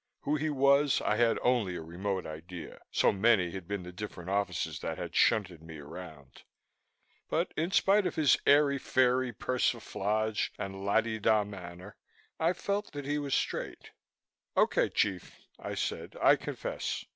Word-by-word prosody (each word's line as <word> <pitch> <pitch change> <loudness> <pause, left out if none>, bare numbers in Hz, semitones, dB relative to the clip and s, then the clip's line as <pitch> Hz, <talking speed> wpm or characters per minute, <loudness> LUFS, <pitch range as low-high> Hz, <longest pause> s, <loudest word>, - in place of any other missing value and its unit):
Who 150 - 0
he 155 +1 -1
was, 140 0 +4
I 105 - +1
had 115 -1 +3
only 115 -8 +2
a 80 - -5
remote 95 +4 -3
idea, 85 +2 -8
so - - +3
many 100 -3 +3
had 95 -2 -7
been 100 -2 -3
the 90 - -8
different 90 -1 -7
offices 100 0 -1
that - - -4
had - - -6
shunted 90 -6 +2
me 80 -1 -10
around. 75 -2 -11 0.9
But - - 0
in 165 +2 0
spite 195 +1 +3
of - - -4
his 155 -3 +5
airy 140 -1 +5
fairy 130 -1 +2
persiflage 110 -3 -1
and 95 -1 -6
la 100 +3 +3
di 110 -1 -4
da 110 0 +3
manner, 95 -1 -10 0.4
I 165 +2 +2
felt 200 +1 -3
that 145 -1 -6
he 145 +1 -1
was 140 -2 -1
straight. - - -3 0.7
"Okay, - - +3
chief," 95 -4 -1 0.2
I - - -5
said. - - -4
"I - - +6
confess. - - -4
105 Hz, 160 wpm, -30 LUFS, 90-140 Hz, 0.9 s, I